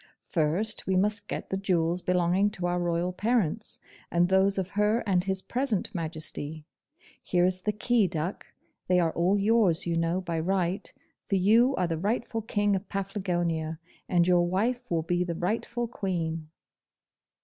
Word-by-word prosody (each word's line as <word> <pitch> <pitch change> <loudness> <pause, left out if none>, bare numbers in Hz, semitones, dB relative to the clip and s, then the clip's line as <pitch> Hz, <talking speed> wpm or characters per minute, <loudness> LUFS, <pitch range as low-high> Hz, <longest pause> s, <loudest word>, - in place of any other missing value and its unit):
'First, 175 +8 +2
we 190 - +1
must 205 +2 0
get - - -5
the 190 - 0
jewels 180 -2 0
belonging 180 +3 +2
to 195 -4 -5
our 175 0 0
royal 175 +1 -1
parents. 215 -1 -1 0.3
and 175 +1 +2
those 190 +1 +3
of 190 0 -2
her 210 +3 +2
and 185 -4 +1
his 190 -1 -2
present 245 -6 -1
Majesty. 155 -2 -4 0.6
Here 180 -1 +2
is 185 0 0
the 210 - 0
key, 215 0 +2
duck; 170 +2 -4 0.4
they 180 0 +4
are 165 -2 +2
all 180 +5 +2
yours, 200 -4 +3
you 170 -1 0
know, 165 +2 +1
by 170 -3 -3
right, 185 +2 -1 0.4
for - - +1
you 225 +8 +4
are 185 - +1
the 165 -2 -2
rightful 225 +3 -1
King 205 -2 +1
of 190 +1 -5
Paflagonia, 175 -5 -2 0.3
and 175 -1 +3
your 175 -1 +4
wife 240 +7 -1
will 165 -2 0
be 175 +2 0
the 170 -2 -3
rightful 230 +6 -2
Queen. 165 -7 -3
185 Hz, 165 wpm, -28 LUFS, 170-205 Hz, 0.6 s, they